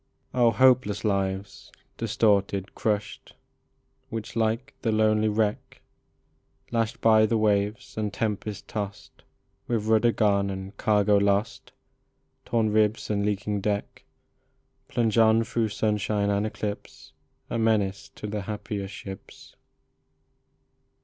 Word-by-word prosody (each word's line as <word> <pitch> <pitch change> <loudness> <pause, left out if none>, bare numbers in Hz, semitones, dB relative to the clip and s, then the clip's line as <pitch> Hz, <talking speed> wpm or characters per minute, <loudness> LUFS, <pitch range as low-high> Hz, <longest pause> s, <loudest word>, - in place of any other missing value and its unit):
Oh, 120 -2 +4
hopeless 120 -3 +3
lives, 100 -1 -2 0.2
distorted, 100 -4 +1
crushed, 105 -1 -3 0.7
Which, 110 0 -6
like 115 +5 -1
the 115 - 0
lonely 110 0 +3
wreck, 105 0 -1 0.9
Lashed 115 -1 -1
by 110 -1 +5
the 115 - +1
waves 105 0 0
and 105 -1 -1
tempest 105 -1 -3
tossed, 100 -2 -6 0.5
With 115 -3 -1
rudder 110 +2 +4
gone 100 -3 +2
and 95 0 -6
cargo 105 -1 +3
lost, 100 +2 0 0.7
Torn 110 -2 +1
ribs 110 +1 +1
and 100 -1 0
leaking 105 0 -1
deck, 100 0 -3 0.8
Plunge 115 -2 +1
on 110 0 +5
through 115 -1 -1
sunshine 105 -1 0
and 100 +1 +1
eclipse, 105 -1 -6 0.4
A 115 - -1
menace 105 -4 0
to - - -8
the 105 0 -3
happier 105 -1 -5
ships. 95 -1 -10
105 Hz, 115 wpm, -26 LUFS, 100-110 Hz, 0.9 s, by